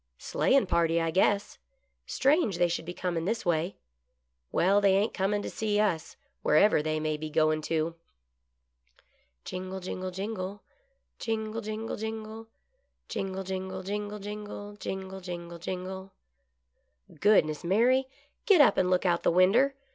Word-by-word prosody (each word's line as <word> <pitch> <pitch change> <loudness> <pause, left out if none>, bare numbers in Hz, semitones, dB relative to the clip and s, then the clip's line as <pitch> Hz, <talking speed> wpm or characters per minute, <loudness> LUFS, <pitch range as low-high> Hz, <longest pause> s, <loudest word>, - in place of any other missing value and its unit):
" - - -51
Sleighin' 270 -4 +3
party, 170 -2 +2
I 165 -1 0
guess. 200 +3 +1 0.5
Strange 270 - +2
they 175 0 +4
should 170 -1 -3
be 175 - -5
GOOD - - -13
LUCK. - - -4
63 - - +2
cornin' 165 - -4
this 225 +3 -1
way. 170 +2 0 0.8
Well, 195 +3 +3
they 195 -1 +4
ain't 205 +3 +1
cornin' 205 +1 0
to - - -4
see 210 -2 0
us, 170 -7 0 0.3
wherever 155 +3 +4
they 155 0 -1
may 155 0 -1
be 155 +1 -5
goin' 155 0 +2
to." 160 +1 -1 1.5
Jingle, 185 +1 -5
jingle, 185 0 -4
jingle, 195 +1 -5 0.6
Jingle, 220 0 -2
jingle, 215 +1 -4
jingle; 220 +1 -6 0.6
Jingle, 190 0 -3
jingle, 190 0 -4
jingle, 205 +2 -4
jingle. 205 0 -7
Jingle, 190 -1 -5
jingle, 175 -2 -7
jingle 190 +2 -5 0.5
/ - - -48
" - - -23
Goodness, 155 -8 +3
Mary, 245 +9 +3 0.4
get 395 -5 +6
up 290 - +6
and 180 - +2
look 185 +1 +2
out 170 -2 +3
of - - -26
the - - +5
winder. 210 +11 +4
190 Hz, 160 wpm, -29 LUFS, 170-210 Hz, 1.5 s, get